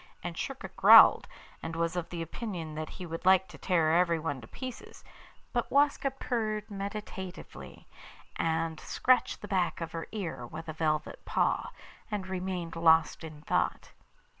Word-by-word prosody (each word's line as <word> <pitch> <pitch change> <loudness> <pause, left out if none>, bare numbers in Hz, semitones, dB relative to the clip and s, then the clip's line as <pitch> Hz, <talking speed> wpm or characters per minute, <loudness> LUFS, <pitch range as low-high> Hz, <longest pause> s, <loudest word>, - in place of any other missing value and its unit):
And 175 -1 -4
Schurka 270 +9 -5
growled, - - +8 0.3
and 165 0 -5
was 165 +1 -1
of 175 -2 -4
opinion 170 -1 -5
that 155 0 -5
he 185 - -8
would 165 -1 -6
like 190 0 +5
to - - -12
tear 165 -4 +2
everyone 165 -4 0
in 115 -3 -11
pieces; 255 - -9 0.5
but - - -1
Waska 285 0 +3
purred 220 -5 -3
meditatively, 195 - -7 0.5
and 160 -1 -1
scratched 255 -2 +1
the - - -5
back 185 -4 0
of 165 -1 -5
her 165 0 -5
ear 160 - -5
with 160 +5 -8
a 155 - -4
velvet 155 -1 -2
paw, - - 0 0.4
and 205 -3 -3
remained 185 -2 -4
lost 165 0 +4
in 155 -2 -9
thought. - - -1
170 Hz, 150 wpm, -30 LUFS, 160-200 Hz, 0.5 s, growled